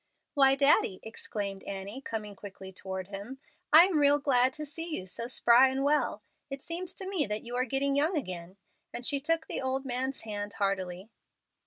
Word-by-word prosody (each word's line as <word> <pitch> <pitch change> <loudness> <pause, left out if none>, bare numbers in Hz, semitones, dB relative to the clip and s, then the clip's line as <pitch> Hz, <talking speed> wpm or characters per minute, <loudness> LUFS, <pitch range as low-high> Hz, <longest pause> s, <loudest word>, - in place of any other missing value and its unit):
"Why, 270 -1 +5
Daddy," 275 -9 +3
exclaimed 205 -3 -5
Annie, 200 +6 -6
coming 215 -5 -5
quickly 190 -1 -10
toward 190 0 -6
him. 205 +7 -7 0.3
"I 315 +3 +10
am 360 -5 +1
real 290 0 +5
glad 260 -3 +3
to 305 - -6
see 325 +2 -4
you 185 - -6
so 230 +5 -3
spry 245 +1 +5
and 265 +1 -2
well. 295 +1 +1 0.3
It 275 0 -6
seems 345 +2 -4
to 380 - -7
me 370 - 0
that 210 +1 -3
you 240 +1 -6
are 250 +1 +1
getting 275 +2 0
young 310 +5 +2
again;" 185 - -5 0.3
and 240 - -6
she 280 -1 +1
shook 330 +1 +1
the - - -3
old 265 +1 -2
man's 260 +1 -2
hand 205 -1 -5
heartily. 195 0 -2
255 Hz, 190 wpm, -29 LUFS, 200-285 Hz, 0.3 s, I